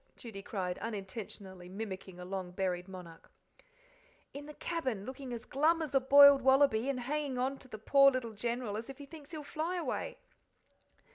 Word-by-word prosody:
Judy 220 -5 -8
cried, 185 -3 -3
unintentionally 195 -3 -7
mimicking 190 -2 -7
a 180 - -7
long 190 -1 -4
buried 180 0 -2
monarch. 180 -3 -11 1.0
"In 290 +1 -8
the 300 - -10
cabin, 260 - -3
looking 260 0 -7
as 235 -2 -6
glum 315 +5 +2
as 310 -4 -4
a 270 - +5
boiled 280 +1 +8
wallaby, 265 -2 +4
and 255 -3 -1
hanging 285 0 -2
on 265 +2 -1
to 260 - -14
the 220 - -8
poor 275 +6 +6
little 255 -4 -3
General 235 0 -3
as 230 +4 -7
if 270 - -8
he 285 - -9
thinks 295 0 -13
he'll 310 -3 -7
fly 315 +5 -3
away." 345 - -3
245 Hz, 180 wpm, -33 LUFS, 195-280 Hz, 1.0 s, boiled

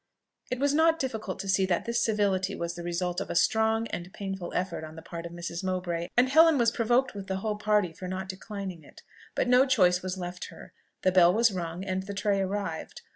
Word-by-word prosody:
It 250 - -1
was 280 +2 +1
not 325 +2 +4
difficult 220 - -3
to 195 - -7
see 195 0 +3
that 175 -2 0
this 235 0 0
civility 200 -3 +1
was 170 0 -3
the 175 - -7
result 175 +1 -2
of - - -5
a - - -3
strong 220 +4 +2
and 175 +1 -5
painful 195 -3 -5
effort 180 -3 -2
on 155 0 -9
the 160 - -10
part 170 0 -6
of - - -12
Mrs. 170 +1 -5
Mowbray, 180 -2 -2
and 245 +1 +6
Helen 320 +2 +6
was 235 -2 +3
provoked 240 +3 +1
with 200 -2 -7
the 190 - -2
whole 210 +2 -2
party 210 -5 +2
for 185 +3 -7
not 185 +1 -4
declining 190 -3 -6
it; - - -16 0.3
but - - +1
no 250 +1 +6
choice 180 -8 +4
was 185 0 -4
left 180 0 -5
her - - -12 0.3
the 185 - +4
bell 180 -1 +6
was 230 +3 +3
rung, 175 -1 -4
and 190 0 -1
the 200 +1 -7
tray 200 0 +1
arrived. 190 -4 -4
190 Hz, 230 wpm, -28 LUFS, 180-220 Hz, 0.3 s, and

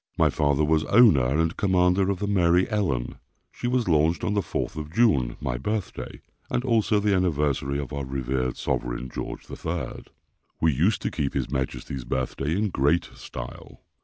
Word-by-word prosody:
My - - +4
father 75 0 +2
was 80 +1 +2
owner 100 - +6
and 80 +5 +1
commander 95 0 +3
of 100 - 0
the 105 - -2
Mary 90 -3 +3
Ellen. 90 - -1 0.3
She 120 - -4
was 125 -2 +1
launched 80 0 +2
on 105 - 0
the 100 - +2
4th 80 - -3
of 75 -1 -6
June, 80 - +2
my - - -3
birthday, 105 - -4 0.3
and 125 -1 -1
also 110 -3 +2
the 100 0 +2
anniversary 75 -6 0
of 70 0 -5
our 70 -1 -3
revered 65 -1 -2
sovereign, - - -2
George - - -6
III. 80 -5 -5 0.5
We 80 -2 +3
used 90 - +1
to - - -1
keep 70 -4 -2
his - - -2
majesty's 65 -1 -3
birthday 65 +5 -2
in 105 0 +1
great 75 +5 +1
style. - - -9
80 Hz, 170 wpm, -25 LUFS, 70-100 Hz, 0.5 s, owner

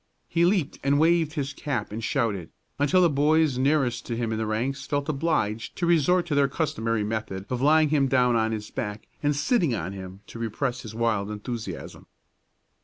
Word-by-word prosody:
He 170 +1 +2
leaped 180 -6 +1
and 140 +1 +3
waved 165 -1 +3
his 140 -3 -3
cap 125 -10 -3
and 110 +2 -5
shouted, 110 - -1 0.3
until 145 +6 +4
the - - +6
boys 150 -1 +3
nearest 130 -3 +1
to 115 - -3
him 115 -1 -1
in 110 - -1
the 110 - -1
ranks 130 +5 -2
felt 145 -1 -1
obliged 135 -8 -1
to 175 - -1
resort 175 +1 +3
to 170 - -3
their 140 -1 +4
customary 115 -7 -1
method 105 -3 -3
of 125 -1 -1
laying 155 +2 +5
him 140 -2 +3
down 125 -2 +3
on 110 -1 +1
his 105 -1 -5
back 105 0 -4 0.2
and 145 0 +1
sitting 150 - +2
on 95 -1 -4
him 95 0 -9
to 115 - -10
repress 120 +3 -2
his 110 -1 -9
wild 110 -3 0
enthusiasm. 110 +2 -6
130 Hz, 190 wpm, -26 LUFS, 110-150 Hz, 0.3 s, the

